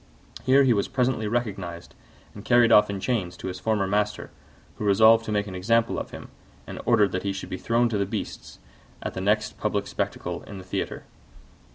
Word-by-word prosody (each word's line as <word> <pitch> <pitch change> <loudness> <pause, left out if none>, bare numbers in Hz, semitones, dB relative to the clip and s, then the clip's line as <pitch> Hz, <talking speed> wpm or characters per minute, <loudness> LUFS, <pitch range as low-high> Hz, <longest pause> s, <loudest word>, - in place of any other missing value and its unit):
Here 135 +2 +5
he 130 -3 +4
was 100 -2 0
presently 125 -4 0
recognised 100 -7 -4 0.4
and 105 - -10
carried 120 -1 +4
off 105 - +6
in 100 -1 -3
chains 95 -6 -2
to 95 - -5
his 90 0 -6
former 110 -2 0
master, 105 +2 -1 0.5
who - - -3
resolved 110 +3 +5
to 110 - -4
make 105 -1 0
an 100 - -8
example 115 +5 +1
of - - -6
him, - - -10 0.4
and - - -7
ordered 105 -3 +4
that 95 - -2
he 100 - -2
should 95 - -7
be 95 - -4
thrown 120 +1 +2
to 105 -3 -1
the 100 - 0
beasts - - -6 0.5
at - - -4
the 95 - -4
next 105 +2 0
public - - -1
spectacle - - -4
in 100 - -9
the 95 - -9
theatre. 90 - -4
105 Hz, 205 wpm, -25 LUFS, 95-115 Hz, 0.5 s, off